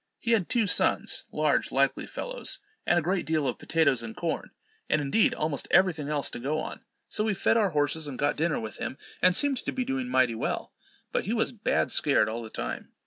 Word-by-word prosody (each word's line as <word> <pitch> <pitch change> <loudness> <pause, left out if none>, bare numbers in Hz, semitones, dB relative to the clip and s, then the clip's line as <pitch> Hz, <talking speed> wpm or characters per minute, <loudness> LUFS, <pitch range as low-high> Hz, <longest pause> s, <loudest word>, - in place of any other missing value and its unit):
He 235 - -2
had 215 -7 +2
two 235 -3 +2
sons, - - +1
large - - +1
likely - - +1
fellows, - - -2 0.3
and 175 - +4
a 170 - +2
great 185 +3 0
deal 155 -3 0
of 125 - -3
potatoes 155 -7 +2
and 115 -1 -8
corn, - - -2 0.4
and, 155 - +3
indeed, 145 +10 +2
almost 150 -2 -2
every 185 -1 +5
thing 150 -2 -6
else 150 -2 -1
to - - -6
go 145 +5 -1
on; - - -6 0.3
so 210 - 0
we 215 -2 0
fed - - +2
our 215 -4 +3
horses 150 0 0
and 135 -3 -6
got 145 0 +1
dinner 165 0 0
with 110 -1 -7
him, 130 - -5 0.2
and 185 -1 +5
seemed 285 +1 +4
to - - -3
be 255 -1 -2
doing 265 -1 -2
mighty 130 - +3
well. 110 - -3 0.4
But - - -1
he 210 - -1
was 225 - +1
bad 225 -3 0
scared 140 -6 +4
all 115 +2 -4
the 110 - -8
time. - - -5
160 Hz, 225 wpm, -28 LUFS, 140-215 Hz, 0.4 s, every